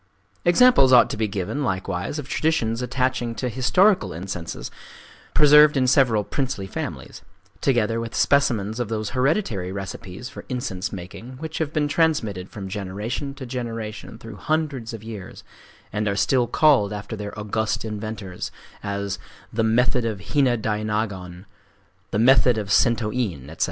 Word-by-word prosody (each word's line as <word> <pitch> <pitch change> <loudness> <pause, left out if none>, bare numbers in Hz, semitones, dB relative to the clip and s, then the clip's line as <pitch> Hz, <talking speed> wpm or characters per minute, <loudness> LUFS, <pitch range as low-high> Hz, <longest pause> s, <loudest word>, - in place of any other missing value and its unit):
Examples 175 - +6
ought 125 -2 +7
to - - -2
be 110 0 +1
given 100 +8 -3
likewise 95 - -2
of 145 -3 -5
traditions 140 -7 0
attaching 125 -1 -1
to 125 - -2
historical 130 - +3
incenses 85 -1 -6 0.6
preserved 150 0 +7
in 130 - +3
several 125 -5 +4
princely 130 -5 -2
families, 95 - -6 0.4
together 115 -3 +2
with 115 0 -5
specimens 115 -6 +2
of 120 -3 -2
those 110 -2 -2
hereditary 125 - 0
recipes 95 +3 -6
for 130 - -9
incense 120 -8 -3
making 105 +7 -8
which 160 +2 -5
have 155 -2 -1
been 150 -1 +1
transmitted 135 - 0
from 100 -2 -7
generation 105 +8 -4
to 135 - -7
generation 115 -4 -5
through 115 -2 -10
hundreds 150 -7 -1
of 115 -2 -8
years, 110 -4 -8 0.5
and 105 +1 -1
are 100 - 0
still 120 +5 +2
called 135 -10 +4
after 105 +2 -5
their 105 0 -7
august 110 +2 -1
inventors,—as 100 -1 -5 0.3
"the 115 +1 +1
Method 125 +3 +2
of 110 -3 -2
Hina 135 -5 +3
Dainagon," 105 -4 -3 0.6
"the - - -1
Method 125 +1 +5
of 105 -2 -3
Sentō 115 +1 +3
In," 85 - -3
etc. 80 - -12
115 Hz, 145 wpm, -23 LUFS, 100-130 Hz, 0.6 s, ought